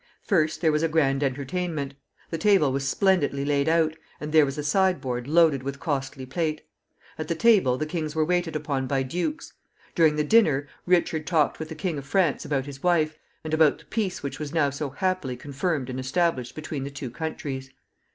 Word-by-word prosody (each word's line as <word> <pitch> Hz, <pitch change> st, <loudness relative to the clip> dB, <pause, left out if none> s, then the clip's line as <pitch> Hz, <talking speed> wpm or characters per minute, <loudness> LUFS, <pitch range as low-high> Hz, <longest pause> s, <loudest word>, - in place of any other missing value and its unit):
First 155 Hz, -6 st, +1 dB
there 160 Hz, -3 st, +4 dB
was 150 Hz, 0 st, +1 dB
a 165 Hz, -, +2 dB
grand 145 Hz, -4 st, +2 dB
entertainment. 140 Hz, +2 st, -2 dB, 0.4 s
The 165 Hz, -, -2 dB
table 190 Hz, -7 st, +4 dB
was 135 Hz, 0 st, -1 dB
splendidly 145 Hz, -7 st, +2 dB
laid 145 Hz, +1 st, +1 dB
out, 160 Hz, -1 st, +2 dB, 0.2 s
and 150 Hz, 0 st, -5 dB
there 155 Hz, -2 st, +6 dB
was 135 Hz, +2 st, -5 dB
a 150 Hz, -, -3 dB
sideboard 145 Hz, -7 st, +1 dB
loaded 160 Hz, -3 st, +4 dB
with 140 Hz, +1 st, -5 dB
costly 135 Hz, -4 st, -3 dB
plate. 155 Hz, +2 st, -2 dB, 0.6 s
At 155 Hz, -, -3 dB
the 170 Hz, -, -1 dB
table 185 Hz, -, +4 dB
the 155 Hz, -, -2 dB
kings 155 Hz, -1 st, -4 dB
were 155 Hz, -1 st, +2 dB
waited 175 Hz, -2 st, 0 dB
upon 140 Hz, -3 st, -2 dB
by 135 Hz, 0 st, 0 dB
dukes. 180 Hz, -, -3 dB, 0.4 s
During 160 Hz, -3 st, +4 dB
the 150 Hz, -, +1 dB
dinner, 150 Hz, -7 st, +3 dB, 0.2 s
Richard 170 Hz, -3 st, +2 dB
talked 160 Hz, -5 st, +2 dB
with 160 Hz, 0 st, -5 dB
the 160 Hz, -, -6 dB
King 170 Hz, -5 st, -2 dB
of 140 Hz, -, -11 dB
France 175 Hz, -4 st, +1 dB
about 135 Hz, -2 st, -1 dB
his 140 Hz, -1 st, -9 dB
wife, 155 Hz, -3 st, +1 dB, 0.2 s
and 155 Hz, 0 st, -5 dB
about 155 Hz, -2 st, +4 dB
the -, -, -19 dB
peace 205 Hz, -8 st, -2 dB
which 140 Hz, -, -5 dB
was 150 Hz, -2 st, -5 dB
now 145 Hz, -3 st, +3 dB
so 140 Hz, +1 st, -4 dB
happily 185 Hz, -4 st, -2 dB
confirmed 145 Hz, +1 st, -2 dB
and 130 Hz, 0 st, -4 dB
established 130 Hz, -2 st, 0 dB
between 155 Hz, -3 st, -5 dB
the 140 Hz, -, -4 dB
two 135 Hz, -3 st, -7 dB
countries. 135 Hz, -2 st, -5 dB
155 Hz, 200 wpm, -25 LUFS, 140-165 Hz, 0.6 s, there